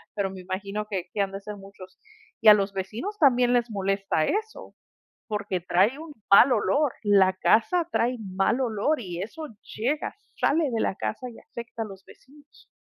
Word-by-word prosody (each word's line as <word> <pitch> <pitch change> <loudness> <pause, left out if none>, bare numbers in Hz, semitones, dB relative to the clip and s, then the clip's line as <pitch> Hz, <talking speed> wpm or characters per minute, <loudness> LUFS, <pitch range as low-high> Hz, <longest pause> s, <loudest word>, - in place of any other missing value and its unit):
pero 195 -2 -1
me 190 - -9
imagino 200 +3 -4
que 185 -3 -4
que 205 - 0
han 195 -1 -1
de 195 - -6
ser 210 +1 -7
muchos. 195 -1 -14 0.4
Y 220 - +2
a 210 - +12
los 200 -1 -1
vecinos 225 - -5
también 250 -4 +4
les 240 -1 +2
molesta 195 -5 0
eso, 435 +1 -3 0.5
porque 205 -4 -2
trae 190 - +2
un 320 -1 -9 0.2
mal 245 +6 +8
olor, 245 +6 +1
la 195 -3 +4
casa 230 - +2
trae 245 +2 +1
mal 195 +6 0
olor 245 +5 0
y 180 -4 -5
eso 305 +9 -6 0.3
llega, 265 +8 -2 0.2
sale 305 -1 +2
de 230 - -1
la 190 - 0
casa 250 +4 -4
y 230 - -13
afecta 235 -1 -8
a - - -6
los 195 -2 -12
vecinos. 290 +2 -20
210 Hz, 180 wpm, -26 LUFS, 195-255 Hz, 0.5 s, a